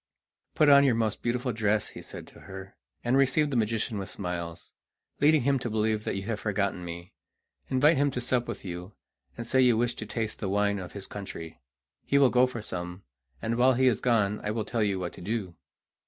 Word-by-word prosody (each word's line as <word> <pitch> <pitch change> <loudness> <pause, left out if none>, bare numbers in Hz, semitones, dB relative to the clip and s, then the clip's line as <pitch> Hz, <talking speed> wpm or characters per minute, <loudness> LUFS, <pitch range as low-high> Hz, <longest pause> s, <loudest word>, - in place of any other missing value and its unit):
"Put 155 - +4
on 140 -1 +8
your 130 -4 +3
most 110 -2 -1
beautiful 125 +1 -1
dress," 105 -1 +1
he - - -10
said - - -9
to - - -16
her, 95 0 -10 0.3
"and 120 +2 +2
receive 140 +2 +3
the - - -1
magician 110 -1 0
with 95 - -5
smiles, 85 -3 -5 0.5
leading 150 -1 +4
him 140 +1 +2
to 120 - -3
believe 110 0 0
that - - -1
you 95 - -3
have 105 0 -3
forgotten 100 -3 -1
me. 85 +1 -8 0.6
Invite 145 +5 +4
him 145 +1 +3
to 125 - -3
sup 125 0 0
with 115 -3 -6
you, 90 +2 -6 0.4
and 120 - -5
say 130 +2 +3
you 125 -3 +5
wish 120 +1 +1
to 105 - -5
taste 110 -1 -3
the 95 - -2
wine 100 0 +1
of 90 -2 -8
his 100 -1 -6
country. 80 -7 -8 0.4
He 140 - +2
will 135 -3 +5
go 125 +1 +5
for 120 -4 -6
some, 90 -1 -5 0.4
and 115 +1 -1
while 130 +2 +5
he 130 +2 +2
is 125 -5 +3
gone 105 -4 +2
I 105 - -2
will 110 0 -2
tell 115 -2 -1
you 100 -2 +1
what 90 -2 -4
to - - -11
do." 100 -2 -3
110 Hz, 220 wpm, -28 LUFS, 100-125 Hz, 0.6 s, on